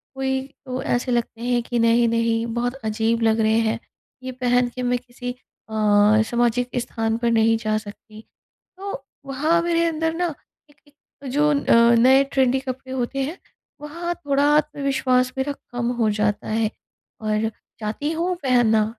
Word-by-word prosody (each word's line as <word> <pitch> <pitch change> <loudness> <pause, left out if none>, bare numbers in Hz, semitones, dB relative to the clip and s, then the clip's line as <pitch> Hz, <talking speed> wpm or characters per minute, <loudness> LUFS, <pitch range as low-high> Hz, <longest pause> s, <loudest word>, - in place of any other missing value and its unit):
कोई 265 0 -1 0.3
तो 255 0 -4
ऐसे 245 +1 -1
लगते 235 -1 -2
हैं 245 0 +1
कि 240 0 -2
नहीं-नहीं 230 0 +2
बहुत 245 +1 -1
अजीब 225 +1 0
लग 225 0 +3
रहे 220 0 +3
हैं, 225 0 0 0.4
ये 260 - -4
पहन 245 -1 +1
के 255 - -4
मैं 245 0 +1
किसी 245 0 -7 0.4
अ, 215 0 +4
सामाजिक 240 +1 +1
स्थान 225 -1 -2
पर 235 0 0
नहीं 225 0 +3
जा 215 0 +1
सकती। 215 0 -10 0.6
तो 390 -8 -6 0.2
वहाँ 305 +5 +1
मेरे 335 -1 +1
अंदर 320 0 -1
ना 345 -3 -1 0.4
एक 290 - -24
एक 285 -1 -14
जो 295 +3 +2
अ, 235 -5 +4
नए 265 +3 +6
ट्रेंडी 265 -1 +2
कपड़े 260 0 -6
होते 260 +2 -2
हैं, 305 +7 -4 0.4
वहाँ 340 +4 -4
थोड़ा 285 -4 0
आत्मविश्वास 270 -4 +1
मेरा 280 +2 0 0.2
कम 245 0 -1
हो 220 -2 +3
जाता 210 -1 0
है 220 0 0 0.5
और 215 0 0 0.3
चाहती 220 +8 -3
हूँ 345 +3 -1
पहनना 235 -4 +3
245 Hz, 160 wpm, -22 LUFS, 225-275 Hz, 0.6 s, नए